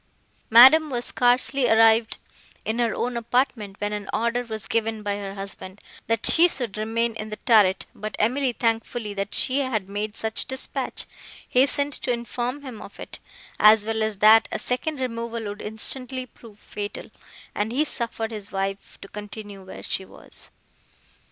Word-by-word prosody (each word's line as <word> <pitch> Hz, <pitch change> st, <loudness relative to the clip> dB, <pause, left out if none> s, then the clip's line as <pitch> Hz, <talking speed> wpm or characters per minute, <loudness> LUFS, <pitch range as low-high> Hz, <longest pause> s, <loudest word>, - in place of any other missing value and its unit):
Madame 265 Hz, +7 st, +8 dB
was 245 Hz, -2 st, -2 dB
scarcely 250 Hz, +1 st, +2 dB
arrived 225 Hz, +1 st, +4 dB, 0.5 s
in 220 Hz, +2 st, -2 dB
her 235 Hz, -2 st, +1 dB
own 245 Hz, 0 st, -2 dB
apartment, 235 Hz, -4 st, -1 dB
when 205 Hz, 0 st, -2 dB
an 205 Hz, -1 st, -5 dB
order 235 Hz, +2 st, 0 dB
was 220 Hz, -2 st, -6 dB
given 225 Hz, -1 st, -1 dB
by 205 Hz, -1 st, -1 dB
her 200 Hz, -1 st, -6 dB
husband, 195 Hz, 0 st, -7 dB, 0.3 s
that 230 Hz, -1 st, 0 dB
she 340 Hz, +2 st, +6 dB
should 245 Hz, -, -4 dB
remain 225 Hz, +2 st, -1 dB
in 215 Hz, 0 st, -6 dB
the 215 Hz, -, -5 dB
turret; 205 Hz, -5 st, +4 dB
but 215 Hz, +1 st, -6 dB
Emily, 255 Hz, +4 st, +1 dB
thankful 225 Hz, -1 st, -2 dB
that 200 Hz, 0 st, -4 dB
she 260 Hz, +2 st, +3 dB
had 230 Hz, -8 st, -1 dB
made 205 Hz, +2 st, -4 dB
such 220 Hz, 0 st, -1 dB
dispatch, 265 Hz, 0 st, -3 dB, 0.4 s
hastened 280 Hz, +2 st, +2 dB
to 255 Hz, -, -3 dB
inform 245 Hz, +3 st, -3 dB
him 250 Hz, -6 st, -8 dB
of -, -, -12 dB
it, -, -, -8 dB, 0.4 s
as 215 Hz, 0 st, +6 dB
well 220 Hz, 0 st, -1 dB
as 215 Hz, -2 st, -1 dB
that 220 Hz, +2 st, +6 dB
a -, -, -1 dB
second 275 Hz, +4 st, -2 dB
removal 230 Hz, -2 st, -4 dB
would 205 Hz, 0 st, -6 dB
instantly 255 Hz, +4 st, -2 dB
prove 230 Hz, -4 st, -17 dB
fatal, 205 Hz, -1 st, -7 dB, 0.4 s
and 210 Hz, +2 st, -2 dB
he 285 Hz, +6 st, +2 dB
suffered 230 Hz, -4 st, -3 dB
his 210 Hz, -2 st, -7 dB
wife 195 Hz, 0 st, -4 dB
to -, -, -9 dB
continue 205 Hz, -1 st, -9 dB
where 185 Hz, -, -10 dB
she 190 Hz, -, -1 dB
was. -, -, -13 dB
225 Hz, 165 wpm, -24 LUFS, 210-245 Hz, 0.5 s, Madame